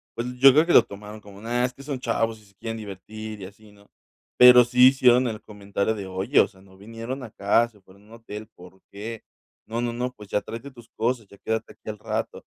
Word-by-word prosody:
Pues, 120 +1 -3
yo 135 +1 +9
creo 155 +3 +5
que 175 - +1
lo - - +8
tomaron 105 0 -10
como 100 0 -14
nada, 120 +2 0
es 125 - -4
que 140 - -13
son 140 -2 -4
chavos 115 -2 -1
y 105 - -21
se 100 -1 -25
quieren 115 +2 -6
divertir, 110 +1 -8
y - - -6
así, 105 +2 -15
¿no? 100 0 -22 0.5
Pero 125 0 +9
sí 125 +1 +6
hicieron 125 -1 +4
el 110 -2 -5
comentario 100 +1 -3
de: 100 -2 -6
"Oye, 95 +1 +1
o - - +5
sea, 95 - -21
no 95 -1 -19
vinieron 115 +6 -7
acá, 115 +1 +1
se 105 -4 -24
fueron 95 +2 -21
a - - -22
un 110 - -20
hotel. 110 -2 -9
¿Por 90 +2 -16
qué? 110 +3 -7 0.4
No, 115 +2 -3
no, 120 -1 -2
no, 125 +1 -3
pues, 105 -4 -14
ya 105 - 0
tráete 115 +5 -8
tus 120 -2 -16
cosas. 115 -2 -2
Ya 100 - -17
quédate 110 +2 -3
aquí - - -11
al 105 -1 -6
rato". - - -4
110 Hz, 245 wpm, -24 LUFS, 100-120 Hz, 0.5 s, yo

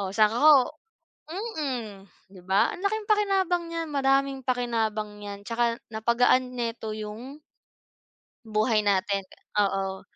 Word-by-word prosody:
oh, 195 - -2
tsaka 215 0 +5
ako 305 +1 +8 1.1
mm, 220 -8 -5 0.2
'di 185 - -13
ba, 190 +3 +2
ang - - -9
laking 420 +2 -1
pakinabang 390 -4 +2
niyan, 330 0 -3
madaming 275 0 +2
pakinabang 220 -4 -2
'yan, 200 0 -8
tsaka 235 0 0 0.2
napagaan 245 +3 +2
nito 230 -2 -3
'yung 220 +6 -7 1.1
buhay 215 0 +1
natin. 200 0 +1 0.4
Oo, 195 -1 -2
230 Hz, 120 wpm, -26 LUFS, 210-270 Hz, 1.1 s, ako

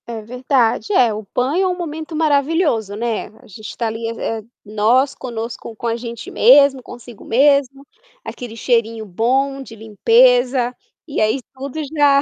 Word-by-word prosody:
É 230 -2 -6
verdade. 250 - 0
É, 240 - +4
o 210 0 -6
banho 280 +9 +1
é - - +2
um 360 -1 -2
momento 320 -1 -6
maravilhoso, 290 - +1
né, 230 0 -2
a - - -19
gente 215 +2 -10
está 230 - -3
ali, 225 +1 -4
eh, 225 -1 -4 0.2
nós 225 +6 +2
conosco 230 -2 -7
com 235 - -5
a 230 - 0
gente 235 -1 -7
mesmo, 270 +2 +5
consigo 240 -2 -12
mesmo, 275 +1 +2 0.4
aquele 240 -3 -8
cheirinho 230 -2 0
bom 265 +8 0
de 235 -4 -11
limpeza, 245 +3 +3 0.3
e 285 - -2
aí 215 +5 +1
tudo 270 +3 -7 0.2
já 285 -2 +4
245 Hz, 155 wpm, -19 LUFS, 225-275 Hz, 0.4 s, mesmo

